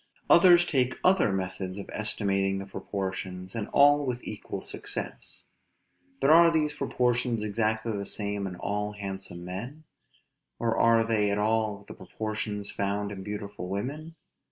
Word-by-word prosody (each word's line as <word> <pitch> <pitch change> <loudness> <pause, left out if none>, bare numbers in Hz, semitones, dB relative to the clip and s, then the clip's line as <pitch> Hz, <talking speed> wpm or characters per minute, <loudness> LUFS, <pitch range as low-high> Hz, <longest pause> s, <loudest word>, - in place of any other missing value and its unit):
Others 175 -2 +7
take 130 -6 +1
other 185 - +4
methods 95 0 -3
of 100 - -6
estimating 100 -2 0
the 95 - -5
proportions, 95 -2 -5
and 110 -2 -3
all 145 +1 +5
with 125 -2 -3
equal - - -6
success. - - -4 0.7
But 145 - +4
are 170 +1 +8
these 155 -2 +1
proportions 120 -4 0
exactly 110 +1 -1
the 100 - -3
same 100 -1 -1
in 90 - -6
all 105 +3 -2
handsome 95 -3 -6
men? 120 +12 -6 0.7
or 115 -1 0
are 115 0 +4
they 110 -2 +1
at 100 - 0
all 105 -1 0
the - - -8
proportions 105 -2 -4
found 100 +1 -2
in 95 -2 -6
beautiful 100 -2 -6
women? 145 - -4
105 Hz, 145 wpm, -28 LUFS, 100-120 Hz, 0.7 s, are